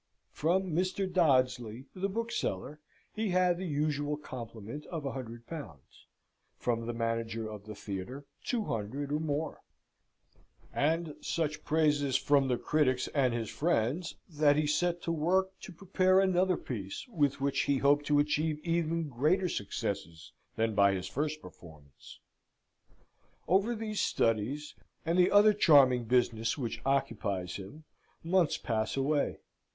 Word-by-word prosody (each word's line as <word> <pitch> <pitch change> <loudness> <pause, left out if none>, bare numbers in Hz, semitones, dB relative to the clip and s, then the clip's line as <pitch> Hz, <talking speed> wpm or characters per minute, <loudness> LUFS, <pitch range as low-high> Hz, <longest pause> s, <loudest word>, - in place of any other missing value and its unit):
From 180 +4 0
Mr. 185 +4 0
Dodsley, 130 - +1
the 190 +1 -2
bookseller, 200 - -3 0.3
he 220 -1 -1
had 180 -1 +2
the 185 - -3
usual 145 -1 -1
complement 120 -1 -8
of 160 -4 -5
a 135 - -1
hundred 120 -3 -7
pounds; 140 - -10 0.5
from 115 -1 -1
the 120 - -2
manager 115 -1 -2
of 105 -1 -9
the 105 - -7
theatre 100 +8 -6 0.2
two 240 -4 -1
hundred 130 - -3
or 150 - +1
more; 155 0 -3 1.1
and 160 +1 0
such 155 -2 -2
praises 145 -3 +2
from 140 0 +3
the 125 -2 +1
critics 130 -2 +1
and 135 -4 +2
his 115 -2 -3
friends, 160 +1 0
that 150 -4 +3
he 150 +1 +1
set 170 +3 0
to 170 - -1
work 180 +4 +1
to - - -9
prepare 185 +1 +2
another 185 -1 +3
piece, 105 - -6
with 145 - 0
which 140 0 0
he 140 - +2
hoped 145 +2 +3
to 145 - +3
achieve 150 +1 +1
even 165 -1 0
greater 155 +9 +1
successes 85 - -4 0.2
than 110 0 0
by 100 -1 +4
his 95 -1 -3
first 150 +8 -3
performance. 75 -5 -14 1.3
Over 200 +7 +2
these 215 -1 -3
studies, 120 +7 0 0.3
and 165 +1 +1
the 180 - +6
other 210 +1 +6
charming 135 - +5
business 115 -1 +1
which 115 -4 -4
occupies 100 -9 -1
him, 100 +11 -10 0.4
months 170 -1 +2
pass 110 +2 -2
away. 140 +2 0
145 Hz, 140 wpm, -31 LUFS, 115-170 Hz, 1.3 s, the